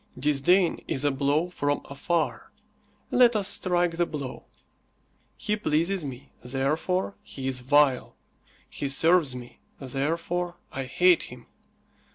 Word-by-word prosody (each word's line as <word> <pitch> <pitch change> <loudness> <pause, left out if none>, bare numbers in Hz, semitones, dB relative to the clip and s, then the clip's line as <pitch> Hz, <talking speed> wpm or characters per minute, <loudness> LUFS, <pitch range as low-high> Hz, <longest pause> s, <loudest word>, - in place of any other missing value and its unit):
Disdain 150 +7 +2
is 135 +2 -1
a 145 - +3
blow 145 +6 0
from 145 -4 -1
afar. 160 +4 -2 0.6
Let 245 -2 +5
us 200 -3 +2
strike 175 -4 +1
the 175 0 +1
blow. 140 -5 -6 0.9
He 210 - -1
pleases 175 -1 0
me, 135 -2 -8
therefore 150 +10 -1
he 135 -1 -7
is 130 -1 -1
vile. 135 0 +2 0.5
He 140 - -4
serves 160 -1 +3
me, 120 -1 -10 0.2
therefore 165 +6 -2 0.2
I 135 0 -4
hate 175 +7 +4
him. 125 -1 -12
150 Hz, 125 wpm, -26 LUFS, 135-175 Hz, 0.9 s, Let